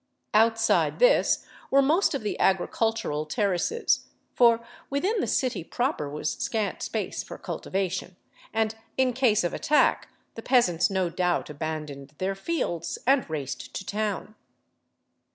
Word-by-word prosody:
Outside 225 +1 +3
this - - +4 0.2
were 275 0 +5
most 315 +4 +3
of 270 - -3
the 210 - -3
agricultural 190 -5 +1
ter 205 +3 +1
races, 450 - 0 0.3
for 235 -1 +4 0.2
within 375 +11 0
the - - 0
city 240 -10 0
proper 240 - -2
was 150 +1 -2
scant 215 -3 -1
space - - -3
for - - -9
cultivation, 185 -1 -3 0.4
and 220 0 0 0.2
in 260 -1 +3
case 240 -6 +3
of 175 - -1
attack 300 - +2 0.2
the 225 - -8
peasants 205 -10 +3
no 190 -3 0
doubt 180 -3 0
abandoned 150 -2 -6
their 190 +1 -1
fields 195 - -2
and 265 -5 +3
raced 145 -3 -5
to 190 - -4
town. 210 0 -3
210 Hz, 135 wpm, -26 LUFS, 175-250 Hz, 0.4 s, were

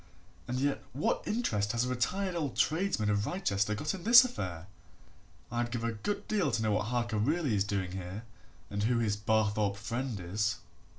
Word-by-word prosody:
And 125 +1 -2
yet 140 +1 0
what 140 - 0
interest 110 - 0
has 120 +1 +1
a - - -2
retired 180 +10 -1
old 155 -6 -2
tradesman 160 - +1
of 105 +1 0
Wrychester 105 - 0
got 150 +8 -2
in 185 -3 -7
this 240 +3 +9
affair? 90 - -5 0.9
I'd 120 0 -1
give 120 -1 -3
a 115 - 0
good 200 - -4
deal 200 -8 +1
to 115 - 0
know 110 - +1
what 105 0 +1
Harker 120 -2 -1
really 145 +3 +1
is 100 -2 +2
doing 100 -3 -2
here 95 +3 -6 0.5
and 100 0 -2
who 120 +3 +2
his 110 -3 +1
Barthorpe 105 -1 +1
friend 115 +2 -3
is." 100 +3 -1
115 Hz, 185 wpm, -31 LUFS, 105-145 Hz, 0.9 s, this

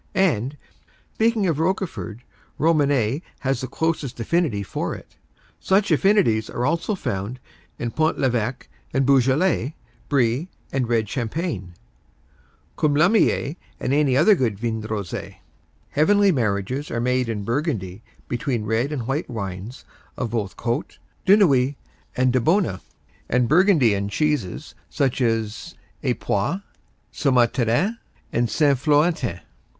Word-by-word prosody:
And, 145 - +1 0.6
speaking 225 -2 +2
of 160 -5 0
Roquefort, 165 - -2 0.4
Romanée 145 -5 +2 0.2
has 135 0 0
the 130 - -3
closest 155 -2 -2
affinity 120 - 0
for - - -3
it. - - -14 0.4
Such 195 +2 +2
affinities 190 - +3
are 120 - -2
also 170 - 0
found 105 - -4 0.4
in 120 -1 -3
Pont 155 +4 +1
l'Evêque 125 -1 -1 0.3
and 135 0 +3
Beaujolais, 135 +2 +2 0.3
Brie 135 +4 +1 0.2
and 130 -3 -1
red 115 -2 +1
champagne, 115 - -3 1.0
Coulommiers 155 - +2 0.2
and 130 - -1
any 145 -2 +3 0.2
good 120 - 0
vin 110 0 -2
rosé. 105 -4 -5 0.6
Heavenly 200 +6 +4
marriages 120 - -1
are 115 - -2
made 125 0 +1
in 105 -3 -3
Burgundy 115 - -2 0.3
between 120 -2 -2
red 115 +6 0
and 130 -6 -3
white 135 +5 -2
wines 100 +1 -6 0.3
of 120 -4 -3
both 105 -5 -3
Côtes, 120 0 -3 0.3
de 200 +2 +8
Nuits 140 -8 +3 0.4
and 130 0 +3
de 130 - +3
Baune, 160 - +1 0.5
and 125 0 +2
Burgundian 135 - +4
cheeses 145 - -1 0.2
such 135 -1 0
as 115 +6 -1 0.3
Epoisses, 125 - -1 0.5
Soumaintarin 130 - +2 0.3
and 120 0 +1
Saint 140 -2 +2
Florentin. 145 - +1
130 Hz, 120 wpm, -23 LUFS, 115-155 Hz, 1.0 s, de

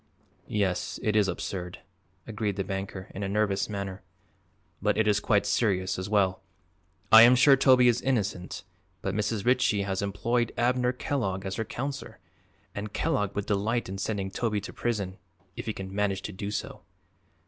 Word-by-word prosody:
"Yes, 100 -4 -1
it 105 - +1
is 105 -2 +4
absurd," 90 0 -4 0.5
agreed 105 -2 -2
the 95 - -1
banker, 95 -1 -5
in 100 - -6
a 100 - -2
nervous 100 -1 0
manner, 100 -1 -5 0.8
"but 105 +1 +1
it 110 - +2
is 105 -1 +3
quite 105 -1 +2
serious, 95 -5 +1
as 95 +2 -4
well. 95 -3 +2 0.7
I 110 - +11
am 120 +2 +8
sure 135 +2 +7
Toby 130 -2 +5
is 120 0 +3
innocent, 105 -8 -2 0.4
but 95 - -1
Mrs. 105 0 -1
Ritchie 125 -5 +3
has 95 -1 -2
employed 115 +4 0
Abner 125 +1 +2
Kellogg 105 -8 -2
as 95 +1 -3
her 110 - -2
counselor 135 +1 -5 0.6
and 105 0 -6
Kellogg 105 -1 0
would 100 0 -2
delight 110 +4 0
in 95 +1 -5
sending 100 -2 -2
Toby 105 0 -1
to 100 - -8
prison 100 -5 -3 0.4
if - - -7
he - - +1
can 95 -1 -7
manage 100 -1 0
to - - -5
do 100 +2 -5
so." 105 - -5
105 Hz, 170 wpm, -28 LUFS, 95-115 Hz, 0.8 s, I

